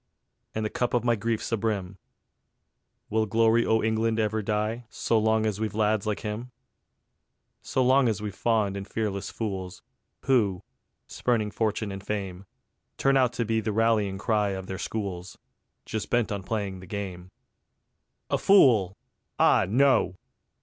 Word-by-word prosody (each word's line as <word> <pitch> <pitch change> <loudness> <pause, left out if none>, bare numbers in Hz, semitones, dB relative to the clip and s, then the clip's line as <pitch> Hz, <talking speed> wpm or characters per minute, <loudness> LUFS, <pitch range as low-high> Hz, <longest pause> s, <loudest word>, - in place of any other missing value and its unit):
And 110 0 -1
the 105 - -2
cup 125 0 -1
of 120 - +1
my 120 -1 +3
grief's 115 +1 -2
abrim. 100 -4 -2 1.1
Will 110 0 +1
Glory 115 +2 +3
o' 110 0 +2
England 110 0 +1
ever 110 0 0
die 110 +3 -2
So 115 +1 0
long 110 0 +2
as 105 -2 -1
we've 110 -2 -2
lads 110 -1 +1
like 105 - -1
him? 110 +4 -5 1.1
So 130 - 0
long 130 0 +4
as 110 -2 -1
we've 105 -1 -5
fond 105 -2 +1
and 100 0 -6
fearless 100 -3 -3
fools, 95 -5 -5 0.4
Who, 105 -9 +1 0.4
spurning 110 -4 -1
fortune 110 -2 -1
and 95 0 -7
fame, 100 -2 -4 0.5
Turn 135 0 +3
out 125 -2 +2
with 115 -1 0
the 110 - -1
rallying 110 -3 +1
cry 105 0 +1
of 95 - -7
their 95 0 -6
schools, 95 -5 -5 0.5
Just 110 -1 -4
bent 120 -2 +1
on 100 -1 -2
playing 100 -2 -3
the 90 - -12
game. 95 -3 -6 1.0
A - - +2
fool! 115 - +5 0.4
Ah - - +4
no! 130 -4 +3
110 Hz, 150 wpm, -27 LUFS, 100-115 Hz, 1.1 s, fool